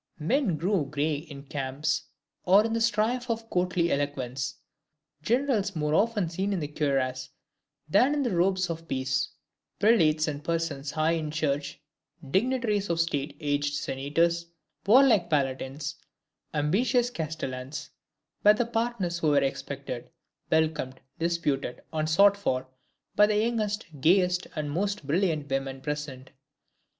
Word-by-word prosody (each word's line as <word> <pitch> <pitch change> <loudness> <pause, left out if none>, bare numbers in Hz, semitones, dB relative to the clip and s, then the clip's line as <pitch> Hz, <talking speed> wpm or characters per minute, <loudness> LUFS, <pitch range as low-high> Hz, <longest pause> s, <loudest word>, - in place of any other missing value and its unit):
Men 190 - +1
grown 170 -3 0
gray 150 +2 0
in 145 -2 -10
camps, 135 +1 -2 0.4
or 195 +4 +5
in 225 - -1
the 230 - 0
strife 230 +3 +1
of 225 0 -2
courtly 180 -1 +1
eloquence; 140 -2 -2 0.7
generals 225 - +1
more 150 -1 0
often 210 0 +2
seen 190 +5 -2
in 190 - -1
the 150 - -3
cuirass 130 -3 -1 0.6
than 245 - +4
in 290 - +1
the 235 -8 0
robes 185 0 +2
of 165 0 -7
peace; 130 -1 -1 0.5
prelates 160 -8 +4
and 145 -1 -4
persons 165 -4 -2
high 155 +2 +1
in 160 -2 -1
the 150 - -7
Church; 145 -2 -1 0.5
dignitaries 215 - +1
of 170 -1 0
State 145 -3 -1
aged 145 -1 0
senators; 165 +6 0 0.4
warlike 230 -5 +6
palatines; 135 -1 -1 0.5
ambitious 235 - +1
castellans; 150 - -5 0.5
were 210 +1 +7
the 240 - +1
partners 225 -7 -1
who 160 - 0
were 145 -2 +4
expected, 135 -2 -4 0.4
welcomed, 155 -5 0 0.2
disputed 150 -7 -1
and 155 0 0
sought 200 +5 +6
for, 130 -10 -1 0.5
by 210 0 +6
the 210 0 +1
youngest, 215 -1 0 0.2
gayest, 180 +2 +3
and 150 -2 -3
most 200 +1 -2
brilliant 155 -1 0
women 135 0 -2
present. 145 -2 -5
160 Hz, 135 wpm, -27 LUFS, 145-205 Hz, 0.7 s, were